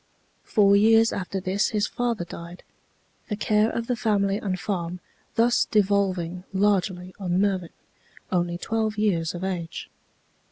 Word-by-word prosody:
Four 200 -2 +4
years 225 +2 +5
after 195 0 -3
this 190 +2 0
his 210 -2 0
father 235 -7 -2
died, 170 +1 -10 0.7
the 210 - -1
care 210 +1 +2
of 230 - -3
the 245 - -1
family 200 -3 +1
and 190 -3 -3
farm 180 -3 -3 0.4
thus 235 +1 +3
devolving 190 -4 +1
largely 190 -2 +1
on 180 -2 0
Mervin, 190 -4 0 0.6
only 175 -1 0
twelve 220 +2 -1
years 175 -6 0
of 175 - -6
age. 175 -4 -4
195 Hz, 135 wpm, -25 LUFS, 180-215 Hz, 0.7 s, years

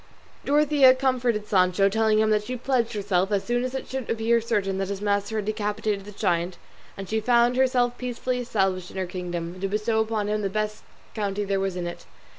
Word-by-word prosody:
Dorothea 290 -3 +5
comforted 250 -5 0
Sancho, 185 0 +3
telling 220 +1 +2
him 215 0 +3
that 210 -1 +3
she 255 +4 -4
pledged 240 -2 0
herself, 195 -2 0
as 200 -2 +1
soon 240 +1 0
as 255 +1 -3
it 265 - -4
should 265 -3 -5
appear 230 +1 +2
certain 200 -4 -1
that 195 - -1
his 200 -1 -3
master 205 +1 -1
had 215 -2 -1
decapitated 210 -1 -2
the 210 - -9
giant, 180 -3 -1 0.4
and 195 -1 -6
she 220 +3 0
found 240 +2 +3
herself 250 -2 +2
peacefully 250 0 -2
established 190 -6 -1
in - - -10
her 190 - -1
kingdom, 175 -1 -5
to 195 - 0
bestow 215 +2 0
upon 220 -1 -1
him 210 0 0
the 195 - -1
best 215 +1 -2 0.3
county 205 -1 -2
there 195 0 0
was 195 -1 -2
in 180 -1 -3
it. 175 - -7
210 Hz, 210 wpm, -25 LUFS, 195-240 Hz, 0.4 s, Dorothea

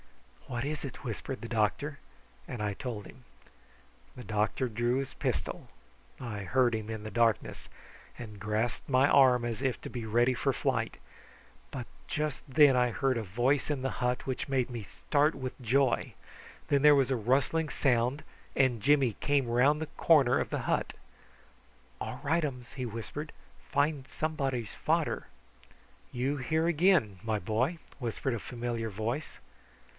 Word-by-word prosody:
"What 125 0 -3
is 150 +1 -3
it?" 140 0 -7
whispered 125 +3 -4
the 115 - -5
doctor; 120 +6 0 0.5
and 120 - -5
I 105 -1 0
told 105 -2 -5
him. 130 - -14 0.9
The 125 - -7
doctor 110 +4 0
drew 120 +2 0
his 135 0 -3
pistol - - -3 0.5
I 115 -5 -5
heard 120 +5 +2
him 110 0 -5
in 110 -1 -5
the 110 - -6
darkness 115 0 +1 0.5
and 110 -4 -8
grasped 110 +5 -2
my 130 +1 +5
arm, 125 -4 +5
as 120 0 -3
if 135 -3 0
to - - -6
be 120 -3 -5
ready 120 +4 +3
for 135 +2 +1
flight; 125 -3 -1 0.7
but 130 -3 -5 0.2
just 150 -2 -2
then 145 -1 +6
I 125 -1 +3
heard 135 +2 +1
a 115 - -2
voice 125 +9 +1
in 145 -3 -1
the 135 0 -1
hut 125 +1 0
which 130 +2 -3
made 130 -2 +1
me 120 -2 -5
start 145 +8 +1
with 130 -2 -6
joy. 130 +2 +1 0.5
Then 140 -1 +3
there 150 0 +8
was 135 -1 +2
a - - +3
rustling 135 +7 +1
sound, 125 +2 +1 0.3
and 125 -5 +2
Jimmy 135 -3 +4
came 140 -3 +2
round 130 +6 +3
the 160 - -2
corner 145 -7 +5
of - - -2
the - - -2
hut. - - 0 1.1
"All - - -4
rightums!" 145 -5 -1
he 130 -3 -4
whispered. 120 +7 -5 0.4
"Find 145 -1 +1
somebody's 135 -8 -2
fader!" - - 0 0.8
"You 130 +4 -1
here 160 +5 0
again, 165 - +3
my 110 -1 0
boy!" 120 - 0 0.2
whispered 125 +1 -2
a 115 - -2
familiar 120 -1 -3
voice. 115 +9 -4
125 Hz, 160 wpm, -30 LUFS, 115-140 Hz, 1.1 s, there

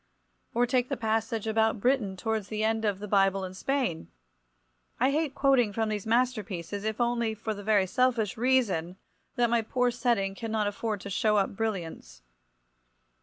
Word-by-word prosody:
Or 240 +1 +4
take 250 0 0
the 275 - -2
passage 225 0 -1
about 220 0 +1
Britain 225 -5 +1
towards 220 0 -2
the 215 0 -3
end 220 0 +1
of 205 -2 +1
"The 210 +1 -7
Bible 195 -1 +2
in 185 - -7
Spain." 235 - -2 0.9
I 260 +3 +3
hate 305 -1 -1
quoting 265 -6 +3
from 220 +1 -1
these 210 -1 -3
masterpieces, 215 -6 -1
if 220 +1 -2
only 235 -2 0
for 220 0 -3
the 205 - -8
very 205 -2 +3
selfish 235 0 +1
reason 220 -9 +1 0.4
that 240 -1 +2
my 235 -1 +3
poor 250 +2 0
setting 235 -5 0
cannot 220 0 -2
afford 205 0 -3
to 200 - -7
show 215 0 +2
up 195 -1 0
brilliants. 190 - -4
220 Hz, 170 wpm, -28 LUFS, 200-240 Hz, 0.9 s, Or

